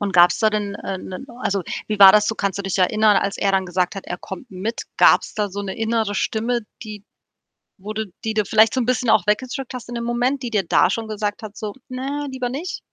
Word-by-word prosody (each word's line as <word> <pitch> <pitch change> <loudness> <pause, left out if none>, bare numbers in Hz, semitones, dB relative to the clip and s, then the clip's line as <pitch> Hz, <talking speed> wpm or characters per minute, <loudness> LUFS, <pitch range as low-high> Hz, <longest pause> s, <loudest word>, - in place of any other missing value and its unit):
Und 200 -2 -2
gab's 175 0 +5
da 220 - +4
denn, 205 -1 -2
äh, 195 - -5
'nen 185 +9 -8
also, 200 -6 -1 0.3
wie 210 -1 -2
war 195 -1 +10
das 210 0 +4
so, 220 - 0
kannst 200 -2 -2
du 200 - -3
dich 195 0 -2
erinnern, 210 +2 +4
als 200 0 0
er 200 - +1
dann 190 -1 +1
gesagt 180 +3 -1
hat, 195 - -7
er 180 - -4
kommt 195 +9 -9
mit? 205 +5 -4
Gab's - - +4
da 210 -1 -1
so 200 +2 -5
'ne 195 -1 -5
innere 225 -2 0
Stimme, 230 +4 -1 0.2
die 210 -2 -9 0.8
wo 205 +3 -7
du 220 0 -3 0.2
die 220 - -1
du 215 -2 +1
vielleicht 220 +2 +4
so 260 - 0
'n - - -1
bisschen 250 -2 0
auch 205 - +4
weggedrückt 255 +4 -1
hast 245 -2 -8
in 240 - -5
dem 235 - -3
Moment, 245 +3 0
die 245 - -3
dir 205 -3 +1
da - - +4
schon 225 +3 -3
gesagt 210 +1 -3
hat 210 -1 -8
so: 210 -2 -5 0.2
„Ne, 275 +3 -4
lieber 255 -2 -3
nicht?“ 305 +8 -5
215 Hz, 250 wpm, -21 LUFS, 200-235 Hz, 0.8 s, war